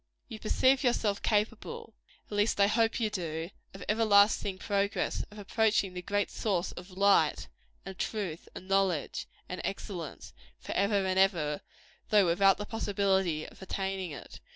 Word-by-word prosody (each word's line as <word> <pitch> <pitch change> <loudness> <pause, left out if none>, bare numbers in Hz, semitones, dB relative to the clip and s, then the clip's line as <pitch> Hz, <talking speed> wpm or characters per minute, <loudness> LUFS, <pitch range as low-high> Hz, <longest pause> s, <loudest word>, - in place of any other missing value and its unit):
You 220 - -8
perceive 260 +5 +3
yourself 220 -5 +1
capable 230 - -1 0.3
at 210 - -7
least 205 +1 +1
I 200 - +7
hope 225 +3 +2
you 220 -2 0
do 165 -2 -4 0.2
of 195 - -8
everlasting 205 -2 +4
progress; 200 +1 -1
of 210 - -14
approaching 210 -2 +1
the 180 - -5
great 205 +2 -1
source 190 -4 -1
of 180 +2 -10
Light, 195 +2 +3 0.4
and 190 -1 -8
Truth, 190 -7 -3
and 185 - -9
Knowledge, 195 -6 0 0.2
and - - -5
Excellence, - - -6 0.2
forever 200 0 0
and 190 0 +1
ever, 165 -7 +2 0.5
though 205 -2 +5
without 195 +3 +4
the 205 - -5
possibility 195 -7 0
of - - -15
attaining 190 -1 -3
it. 145 - -10
200 Hz, 150 wpm, -30 LUFS, 185-210 Hz, 0.5 s, I